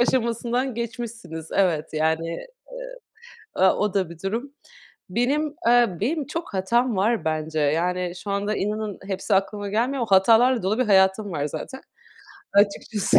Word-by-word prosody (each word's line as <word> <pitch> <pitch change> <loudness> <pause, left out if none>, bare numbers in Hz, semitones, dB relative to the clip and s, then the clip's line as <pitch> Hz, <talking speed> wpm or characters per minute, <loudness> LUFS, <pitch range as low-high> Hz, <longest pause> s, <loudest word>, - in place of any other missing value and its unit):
aşamasından 240 +1 0
geçmişsiniz. 230 -8 -6
Evet 175 -6 +1
yani, 160 +1 0
eee, 170 - -6 1.1
ııı, 190 0 +6
o 210 -2 0
da 190 -4 0
bir 170 - -10
durum. 235 +8 -3 0.6
Benim, 280 +8 0
eee, 240 -6 +4
benim 295 +5 0
çok 325 -7 -5
hatam 235 +5 +1
var 220 +4 +1
bence. 155 0 -1
Yani, 175 +4 0
şu 200 - -4
anda 205 +2 -1
inanın 210 0 -3
hepsi 195 +2 -2
aklıma 200 +1 -1
gelmiyor 245 +6 0
ama 225 - -3
hatalarla 230 +3 +4
dolu 210 +4 +1
bir 255 - +3
hayatım 190 0 +3
var, 145 -2 -2
zaten, 265 - -6 0.7
açıkçası, 205 0 +3
210 Hz, 145 wpm, -24 LUFS, 185-240 Hz, 1.1 s, ııı